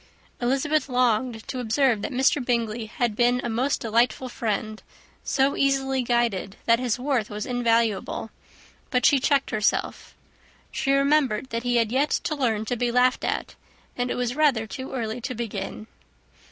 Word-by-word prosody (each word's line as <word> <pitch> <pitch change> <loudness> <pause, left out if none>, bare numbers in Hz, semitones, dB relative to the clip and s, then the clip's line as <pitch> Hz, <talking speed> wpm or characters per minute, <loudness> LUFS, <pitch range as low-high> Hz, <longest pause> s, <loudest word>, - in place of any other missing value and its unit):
Elizabeth 275 +4 +1
longed 245 -2 0
to 255 - -4
observe 245 -1 +2
that - - -4
Mr. 265 +1 +2
Bingley 235 -2 -1
had 230 0 -1
been 245 +2 +3
a 240 - -2
most 255 +5 0
delightful 235 +3 +1
friend; 215 -2 -3 0.4
so 270 0 +1
easily 270 -1 +1
guided 235 -5 0
that 230 0 +4
his 250 -2 0
worth 255 -4 -1
was 210 0 -5
invaluable; 230 -3 0 0.6
but 250 -1 +1
she 280 - +5
checked 275 +1 +1
herself. 210 -1 -1 0.6
She 275 - -1
remembered 275 -4 +2
that 230 0 -2
he 245 0 0
had 230 -2 +2
yet 275 +4 +2
to - - -1
learn 230 -7 0
to 245 - -1
be 240 0 0
laughed 250 +1 +3
at, - - -2 0.4
and 245 0 -2
it - - -1
was 245 0 -1
rather 280 -7 +2
too 260 +4 -7
early 235 -2 -3
to 255 +2 -4
begin. 215 -2 -5
245 Hz, 165 wpm, -25 LUFS, 225-265 Hz, 0.6 s, she